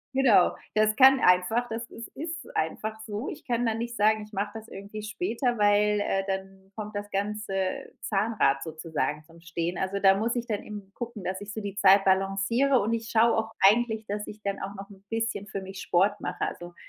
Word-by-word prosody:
Genau. 240 -9 +5 0.2
Das 215 0 +3
kann 265 0 +7
einfach 180 +7 +3
das 225 +1 -3
ist 230 - -8
ist 320 +3 -5
einfach 215 +7 -2
so. 215 +4 -4
Ich 310 - -9
kann 240 0 0
dann 225 0 0
nicht 235 0 -4
sagen, 215 0 +3
ich 210 - -14
mache 205 +1 -2
das 220 0 -9
irgendwie 200 +2 -8
später, 240 0 -1
weil, 205 0 +3
äh, 195 -1 0
dann 190 0 -5
kommt 210 -1 -6
das 205 0 -4
ganze 200 -2 -2
Zahnrad 195 -10 +1
sozusagen 155 -2 -3
zum 165 +1 -18
Stehen. 170 +1 -3
Also, 190 +1 -2
da 195 -1 +6
muss 230 +4 0
ich 240 0 -3
dann 210 -2 -2
eben 205 -2 -9
gucken, 235 -5 -6
dass 190 +2 -3
ich 205 0 -7
so 220 - -4
die 200 -1 -5
Zeit 195 0 +6
balanciere 195 +8 +2
und 220 +3 0
ich 225 -1 -3
schaue 230 +1 +4
auch 225 0 -1
eigentlich, 220 +2 +4
dass 210 +1 -3
ich 215 0 -10
dann 200 0 -2
auch 195 +1 -5
noch 195 +1 -9
'n 195 -1 -16
bisschen 225 -3 -2
für 195 - -5
mich 190 0 -8
Sport 200 +4 +2
mache. - - -5
Also 175 0 -7
205 Hz, 210 wpm, -27 LUFS, 195-225 Hz, 0.2 s, kann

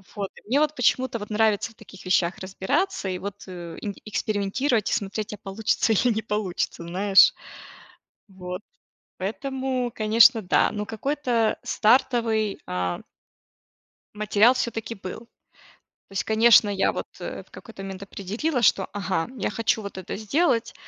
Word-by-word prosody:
Вот. 200 -2 -3
И - - -15
мне, 265 +6 +2
вот, 305 0 +1
почему-то, 250 0 +1
вот, 205 - -7
нравится 215 0 +1
в - - -23
таких 195 -3 -14
вещах 180 -1 +2
разбираться, 190 - -1
и, 185 - -2
вот, 200 +1 -7
э, 175 -2 -8
инг 205 -2 -5
экспериментировать 215 +3 0
и - - +1
смотреть, 210 -1 -3
а 210 - -7
получится 210 +3 0
или 235 +3 +3
не 220 - -2
получится, 210 -6 -2
знаешь. 195 - +5 1.0
Вот. 180 0 -7 0.6
Поэтому, 255 +5 -2
конечно, 225 +2 +5
да. 180 - +2
Но 210 0 -4
какой-то 235 0 0
стартовый, 225 -3 +2
а 90 -1 -2 1.2
материал, 215 +3 +4
всё-таки 230 -3 -3
был. 185 -3 -7 0.9
То - - -14
есть, 195 - -1
конечно, 220 -1 +5
я, 195 -1 +2
вот, - - -4
э, - - -6
в - - -29
какой-то 220 -4 -11
момент 195 0 -7
определила, 220 - -3
что, 195 -4 +3
ага, 190 -4 -1
я - - -1
хочу 220 0 0
вот 200 -1 -8
это 185 - -5
сделать, 230 +2 +1
210 Hz, 150 wpm, -25 LUFS, 195-235 Hz, 1.2 s, знаешь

